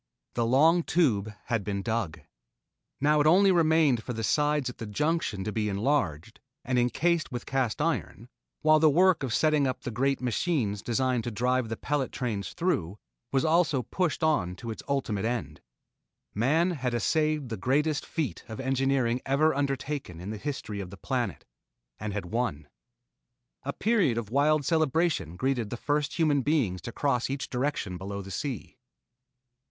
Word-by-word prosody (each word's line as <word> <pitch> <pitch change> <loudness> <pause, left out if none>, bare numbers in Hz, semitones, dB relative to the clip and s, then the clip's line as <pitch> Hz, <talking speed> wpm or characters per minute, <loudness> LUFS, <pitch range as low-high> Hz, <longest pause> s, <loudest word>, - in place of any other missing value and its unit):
The 115 -1 0
long 160 +8 +5
Tube 120 - +1
had 115 -3 -1
been 100 0 -3
dug. 110 -9 -2 0.8
Now 150 +2 +3
it 150 - +3
only 190 +4 +6
remained 160 -7 +3
for 125 - -5
the 115 -1 -4
sides 150 +5 +1
at 125 - -6
the 115 - -5
junction 130 - -1
to 105 - -3
be 105 -1 -1
enlarged 105 - -1 0.3
and 125 0 +1
encased 160 +6 +1
with 120 -1 -5
cast 130 -5 -1
iron, 145 -7 -2 0.4
while 155 0 +6
the 155 0 +6
work 180 +3 +4
of 130 -3 -2
setting 150 +1 +3
up 130 - -3
the 125 - -4
great 135 +4 +1
machines 120 - -1
designed 125 +1 0
to - - -1
drive 125 +2 0
the 115 - -3
pellet 145 -3 -1
trains 110 -6 -3
through, 105 - -1 0.3
was 135 +1 +2
also 155 -5 +3
pushed 175 - -1
on 105 - +1
to 115 +4 -6
its 110 - -7
ultimate 130 -8 -1
end. 120 +1 -3 0.7
Man 155 - +2
had 130 -7 -2
essayed 150 +3 +1
the 115 - -3
greatest 145 +8 +1
feat 155 -6 -3
of 110 - -7
engineering 130 -2 +1
ever 145 +4 +3
undertaken 135 - -3
in 95 +4 -6
the 110 - -5
history 110 -5 -4
of 95 -3 -5
the 100 - -10
planet, 120 - -3 0.5
and 105 0 -3
had 100 -2 -4
won. 90 -7 -2 0.9
A 140 - -3
period 200 - +2
of 110 -2 -4
wild 145 +2 +3
celebration 155 - +1
greeted 125 -1 -1
the 120 - -4
first 145 +3 -1
human 150 -4 +3
beings 125 - 0
to 115 - -6
cross 125 -1 0
each 135 0 -4
direction 125 -9 -2
below 100 +1 -5
the 95 - -9
sea. 130 +1 -5
130 Hz, 170 wpm, -28 LUFS, 110-150 Hz, 0.9 s, only